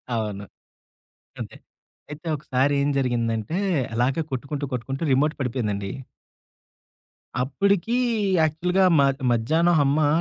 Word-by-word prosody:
అవును. 105 Hz, -3 st, -3 dB, 1.0 s
అంతే. -, -, -6 dB, 0.6 s
అయితే 155 Hz, +3 st, -8 dB
ఒకసారి 140 Hz, -1 st, 0 dB
ఏం 140 Hz, -, +1 dB
జరిగిందంటే? 115 Hz, +1 st, -1 dB, 0.4 s
అలాగే 130 Hz, +7 st, +1 dB
కొట్టుకుంటూ, 140 Hz, +2 st, -3 dB
కొట్టుకుంటూ 135 Hz, +5 st, -3 dB
రిమోట్ 145 Hz, +4 st, +3 dB
పడిపోయిందండి. 105 Hz, -6 st, -2 dB, 1.5 s
అప్పటికి 200 Hz, -, +1 dB, 0.5 s
యాక్చువల్‌గా 180 Hz, +5 st, +2 dB
మాక్ 135 Hz, -1 st, +2 dB
మధ్యాహ్నం 160 Hz, +10 st, +2 dB
హమ్మా, 145 Hz, +2 st, +3 dB
135 Hz, 95 wpm, -24 LUFS, 120-155 Hz, 1.5 s, రిమోట్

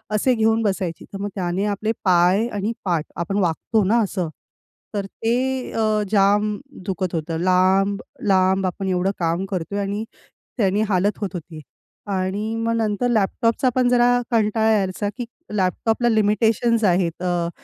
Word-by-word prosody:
असे 250 Hz, +4 st, +3 dB
घेऊन 225 Hz, 0 st, +2 dB
बसायची. 190 Hz, -4 st, -2 dB
तर 195 Hz, -, -5 dB
मग 205 Hz, -, -2 dB
त्याने 185 Hz, +1 st, -1 dB
आपले 215 Hz, +2 st, -1 dB
पाय 185 Hz, +5 st, +4 dB
आणि 210 Hz, 0 st, -2 dB
पाठ 170 Hz, -4 st, 0 dB
आपण 185 Hz, +4 st, -2 dB
वाकतो 195 Hz, +5 st, +1 dB
ना 225 Hz, +5 st, +3 dB
असं, 180 Hz, -4 st, -2 dB, 0.7 s
तर 200 Hz, -1 st, -1 dB
ते 250 Hz, +5 st, -2 dB
अ, 215 Hz, -1 st, +1 dB
जाम 205 Hz, +1 st, +3 dB, 0.3 s
दुखत 185 Hz, -2 st, -2 dB
होतं. 160 Hz, +1 st, -2 dB
लांब, 190 Hz, +2 st, +3 dB, 0.3 s
लांब 190 Hz, 0 st, +3 dB
आपण 190 Hz, +1 st, -4 dB
एवढं 185 Hz, +1 st, +1 dB
काम 170 Hz, +3 st, 0 dB
करतोय 190 Hz, +3 st, -3 dB
आणि 205 Hz, +3 st, -3 dB, 0.5 s
त्यानी 200 Hz, -1 st, +2 dB
हालत 195 Hz, +2 st, +1 dB
होत 200 Hz, -, -1 dB
होती. 160 Hz, -2 st, -8 dB, 0.5 s
आणि 200 Hz, +3 st, -2 dB
मग 230 Hz, 0 st, -1 dB
नंतर 220 Hz, +2 st, 0 dB
लॅपटॉपचा 230 Hz, +3 st, +1 dB
पण 250 Hz, -1 st, +3 dB
जरा 245 Hz, 0 st, +4 dB, 0.2 s
कंटाळा 220 Hz, 0 st, +2 dB
यायचा 200 Hz, 0 st, 0 dB
की 245 Hz, -, -3 dB, 0.3 s
लॅपटॉपला 220 Hz, +5 st, +1 dB
लिमिटेशन्स 220 Hz, +2 st, +2 dB
आहेत. 175 Hz, -1 st, +1 dB
अ, 175 Hz, -1 st, 0 dB
200 Hz, 150 wpm, -22 LUFS, 185-220 Hz, 0.7 s, पाय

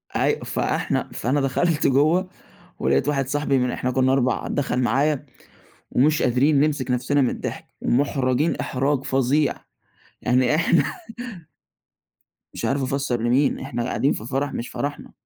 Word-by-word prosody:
أي -, -, +1 dB
فإحنا -, -, -1 dB
فأنا 135 Hz, +5 st, 0 dB
دخَلت 150 Hz, +4 st, +1 dB
جوّه 155 Hz, +7 st, +3 dB, 0.5 s
ولقيت 70 Hz, -, +1 dB
واحد 135 Hz, -3 st, 0 dB
صاحبي 145 Hz, -1 st, +1 dB
من 125 Hz, 0 st, +1 dB
إحنا 125 Hz, -, -2 dB
كُنّا 130 Hz, +1 st, +2 dB
4، 130 Hz, -2 st, +1 dB
دخَل 135 Hz, -3 st, -1 dB
معايا، 140 Hz, +4 st, +1 dB, 0.7 s
ومش 150 Hz, +4 st, +3 dB
قادرين 135 Hz, +4 st, +3 dB
نمسك 145 Hz, -4 st, 0 dB
نَفْسنا 130 Hz, +3 st, +1 dB
من 125 Hz, -, +3 dB
الضحك -, -, -5 dB, 0.2 s
ومُحرَجين 135 Hz, +2 st, +1 dB
إحراج 135 Hz, +1 st, 0 dB
فظيع. 135 Hz, +2 st, +1 dB, 0.7 s
يعني 125 Hz, +3 st, +3 dB
إحنا 170 Hz, +1 st, +3 dB, 1.7 s
مش -, -, -4 dB
عارف 135 Hz, 0 st, 0 dB
أفسَّر 130 Hz, -3 st, -1 dB
لمين، 125 Hz, +4 st, +2 dB
إحنا 120 Hz, -, -4 dB
قاعدين 135 Hz, +3 st, +1 dB
في 110 Hz, -, -6 dB
فَرَح 135 Hz, +3 st, -2 dB
مش 120 Hz, -, -4 dB
فرحنا. 145 Hz, 0 st, -5 dB
135 Hz, 140 wpm, -23 LUFS, 125-145 Hz, 1.7 s, جوّه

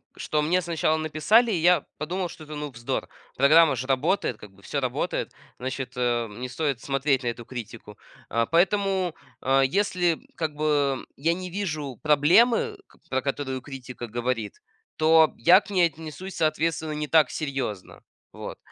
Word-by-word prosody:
что 150 Hz, -, -1 dB
мне 175 Hz, +5 st, +2 dB
сначала 165 Hz, -2 st, 0 dB
написали, 160 Hz, +10 st, +3 dB
я 175 Hz, -1 st, +3 dB
подумал, 175 Hz, +4 st, -3 dB
что 165 Hz, -1 st, -11 dB
это, 155 Hz, 0 st, -8 dB
ну, 150 Hz, 0 st, -4 dB
вздор, 120 Hz, -1 st, -3 dB, 0.3 s
программа 155 Hz, +3 st, +6 dB
же 130 Hz, +1 st, -5 dB
работает, 135 Hz, -, +1 dB
как 105 Hz, -, -13 dB
бы 100 Hz, 0 st, -21 dB
всё -, -, -2 dB
работает, -, -, -2 dB, 0.3 s
значит, 130 Hz, 0 st, -4 dB
э, 120 Hz, -2 st, 0 dB
не 120 Hz, +5 st, -7 dB
стоит 140 Hz, -1 st, -2 dB
смотреть 135 Hz, -1 st, 0 dB
на -, -, -2 dB
эту 120 Hz, 0 st, -4 dB
критику, 115 Hz, -4 st, -9 dB, 0.3 s
а. 115 Hz, 0 st, +1 dB
Поэтому, 190 Hz, -, +1 dB, 0.3 s
а, 135 Hz, +1 st, +3 dB
если, 175 Hz, +3 st, +1 dB, 0.2 s
как 155 Hz, -3 st, -3 dB
бы, 145 Hz, -3 st, 0 dB
я 165 Hz, +5 st, +1 dB
не 185 Hz, +1 st, -6 dB
вижу 155 Hz, -, -4 dB
проблемы, 225 Hz, -, +4 dB
ка -, -, -24 dB
про 130 Hz, 0 st, 0 dB
которую 135 Hz, -1 st, -3 dB
критика 125 Hz, -3 st, -8 dB
говорит, 120 Hz, -2 st, -3 dB, 0.4 s
то 160 Hz, 0 st, +5 dB
я 175 Hz, +11 st, +7 dB
к -, -, -15 dB
ней 180 Hz, -4 st, +4 dB
отнесусь, 165 Hz, +4 st, -9 dB
соответственно, 160 Hz, 0 st, 0 dB
не 150 Hz, 0 st, -3 dB
так 155 Hz, -4 st, +4 dB
серьезно. 135 Hz, -, -4 dB, 0.3 s
Вот, -, -, -8 dB
150 Hz, 160 wpm, -25 LUFS, 130-170 Hz, 0.4 s, я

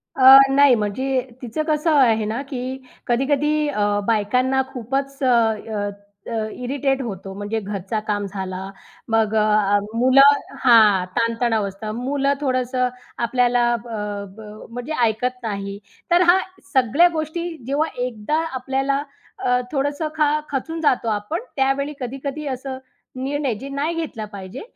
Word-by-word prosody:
अ, 265 Hz, 0 st, +9 dB, 0.2 s
नाही 280 Hz, -2 st, +6 dB
म्हणजे 255 Hz, +5 st, -1 dB, 0.2 s
तिचं 250 Hz, +5 st, -3 dB
कसं 310 Hz, +1 st, +2 dB
आहे 225 Hz, -4 st, +3 dB
ना, 220 Hz, +5 st, -2 dB
की 260 Hz, -2 st, -5 dB, 0.3 s
कधी-कधी 295 Hz, +4 st, +1 dB
अ, 205 Hz, -7 st, 0 dB
बायकांना 250 Hz, +5 st, +2 dB
खूपच 270 Hz, +3 st, -3 dB
अ, -, -, +3 dB
अ, 220 Hz, -3 st, +1 dB, 0.4 s
अ 220 Hz, -2 st, -2 dB
इरिटेट 270 Hz, +2 st, -1 dB
होतो, 195 Hz, -5 st, -6 dB
म्हणजे 205 Hz, +3 st, -3 dB
घरचा 200 Hz, +1 st, -4 dB
काम 205 Hz, -1 st, -1 dB
झाला, 190 Hz, -1 st, -5 dB, 0.4 s
मग 220 Hz, -1 st, +2 dB
अ, 215 Hz, -, +4 dB, 0.3 s
अ -, -, +4 dB, 0.2 s
मुलं 275 Hz, +3 st, +6 dB, 0.2 s
हां, 215 Hz, -7 st, +6 dB
ताण-तणाव 230 Hz, -2 st, +1 dB
असता, 200 Hz, +2 st, -6 dB
मुलं 275 Hz, +4 st, 0 dB
थोडंसं 255 Hz, -2 st, 0 dB, 0.4 s
आपल्याला 245 Hz, 0 st, +2 dB
अ, 210 Hz, -3 st, -4 dB
ब -, -, -10 dB, 0.3 s
म्हणजे 245 Hz, +6 st, -5 dB
ऐकत 235 Hz, +3 st, 0 dB
नाही, 200 Hz, -2 st, -4 dB, 0.3 s
तर 345 Hz, +1 st, +5 dB
हा 365 Hz, +2 st, +6 dB, 0.3 s
सगळ्या 265 Hz, +7 st, +5 dB
गोष्टी. 320 Hz, +2 st, -3 dB, 0.2 s
जेव्हा 290 Hz, +4 st, +1 dB, 0.2 s
एकदा 250 Hz, +5 st, -2 dB
आपल्याला 270 Hz, +2 st, -1 dB, 0.4 s
अ, 250 Hz, 0 st, +3 dB
थोडंसं 285 Hz, +2 st, -1 dB
खा 300 Hz, -1 st, +2 dB
खचून 320 Hz, +4 st, -3 dB
जातो 255 Hz, -6 st, +2 dB
आपण, 210 Hz, +9 st, -2 dB, 0.2 s
त्यावेळी 275 Hz, +2 st, 0 dB
कधी-कधी 275 Hz, +4 st, -5 dB
असं 265 Hz, 0 st, -4 dB, 0.5 s
निर्णय 280 Hz, -2 st, -1 dB
जे 275 Hz, -, -7 dB
नाही 285 Hz, +4 st, -2 dB
घेतला 310 Hz, -10 st, -4 dB
पाहिजे, 190 Hz, -2 st, -8 dB
250 Hz, 140 wpm, -21 LUFS, 220-275 Hz, 0.5 s, अ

